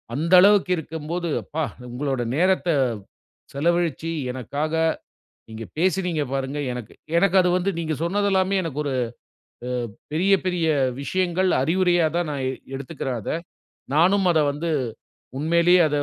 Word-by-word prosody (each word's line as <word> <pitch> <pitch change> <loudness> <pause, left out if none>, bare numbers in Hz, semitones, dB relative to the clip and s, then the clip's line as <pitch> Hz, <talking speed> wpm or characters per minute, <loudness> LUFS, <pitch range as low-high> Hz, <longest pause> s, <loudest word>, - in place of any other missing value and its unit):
அந்த 165 +5 0
அளவுக்கு 200 -1 +5
இருக்கம்போது, 160 +2 -4
அப்பா! 160 +1 -3 0.3
உங்களோட 135 0 -2
நேரத்த 185 +2 +2 0.9
செலவழிச்சு 165 +1 0 0.2
எனக்காக 145 +5 -3 0.8
நீங்க 110 +1 -7
பேசினீங்க 180 -2 +1
பாருங்க 135 +1 -2
எனக்கு. 125 -3 -7 0.2
எனக்கு 195 +2 +3
அது 180 -1 +2
வந்து 185 +2 0
நீங்க 160 -2 -2
சொன்னதெல்லாமே 195 +1 +1
எனக்கு 150 -4 -3
ஒரு 140 - -2 0.8
அ - - -3 0.4
பெரிய 180 +6 +2
பெரிய 180 -3 0 0.3
விஷயங்கள் 185 +5 0
அறிவுரையா 175 +3 +2
தான் 175 -1 0
நான் 140 -2 -3
எ - - 0 0.2
எடுத்துக்கறேன் 135 -2 -4
அத. - - -6 0.6
நானும் 185 +6 +4
அத 160 - +3
வந்து 155 +4 -4 0.7
உண்மையிலயே 170 +4 +4
அத 150 - -1
165 Hz, 125 wpm, -23 LUFS, 145-180 Hz, 0.9 s, அளவுக்கு